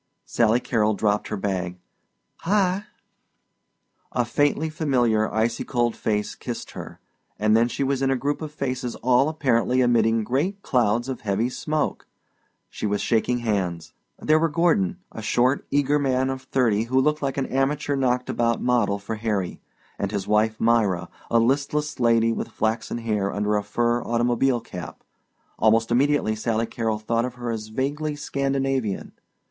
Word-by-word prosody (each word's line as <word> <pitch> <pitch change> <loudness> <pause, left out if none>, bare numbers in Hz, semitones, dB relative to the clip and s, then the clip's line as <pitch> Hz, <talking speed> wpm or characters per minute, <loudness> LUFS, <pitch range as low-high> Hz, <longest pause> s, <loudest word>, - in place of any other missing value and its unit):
Sally 115 +1 +2
Carrol 110 -4 +1
dropped 105 0 0
her 105 - -3
bag. 90 -2 -2 0.6
"Hi!" 195 +1 +1 1.3
A 120 - 0
faintly 145 +6 +1
familiar 120 -8 +1
icy 115 +1 0
cold 120 -2 0
face 105 -1 -1
kissed - - -6
her, - - -9 0.4
and 110 +1 +3
then 115 +1 +4
she 130 - -2
was 135 0 0
in 135 - +2
a 135 - +2
group 145 +4 -2
of 155 -1 -5
faces 130 -4 -3
all 130 +3 +3
apparently 130 -5 +1
emitting 115 -2 +3
great 155 - -1
clouds 120 -1 +1
of 130 -3 -4
heavy 110 +3 0
smoke; 155 +4 -2 0.6
she - - -4
was 105 0 0
shaking 120 +1 +1
hands. 90 -6 -2 0.2
There 155 +1 +3
were 165 +1 +2
Gordon, 155 - +2
a - - -7
short, 125 +3 +1
eager 145 +1 +2
man 130 -1 +1
of 135 0 -5
thirty 115 -5 +1
who 130 +3 +2
looked 150 +3 +1
like 135 -1 -2
an 135 - 0
amateur 140 +2 0
knocked 125 -2 0
about 115 -1 0
model 120 -5 +1
for 100 +2 -5
Harry, 105 -5 -2 0.4
and 100 - -1
his 100 -3 -3
wife, 110 +1 +2
Myra, 105 -7 +2 0.2
a 115 - +3
listless 140 +5 0
lady 115 -1 +3
with - - -3
flaxen 110 +1 -2
hair 105 -4 -1
under 105 +1 0
a 105 - +1
fur 120 +3 0
automobile 120 +1 +1
cap. 90 -6 -9 0.6
Almost 115 +1 +3
immediately 135 -3 +2
Sally 115 +1 0
Carrol 115 -2 -2
thought 115 +2 0
of 125 0 -4
her 120 -1 -4
as 110 -1 -4
vaguely 145 +6 -2
Scandinavian. 135 -6 -1
120 Hz, 160 wpm, -24 LUFS, 110-135 Hz, 1.3 s, then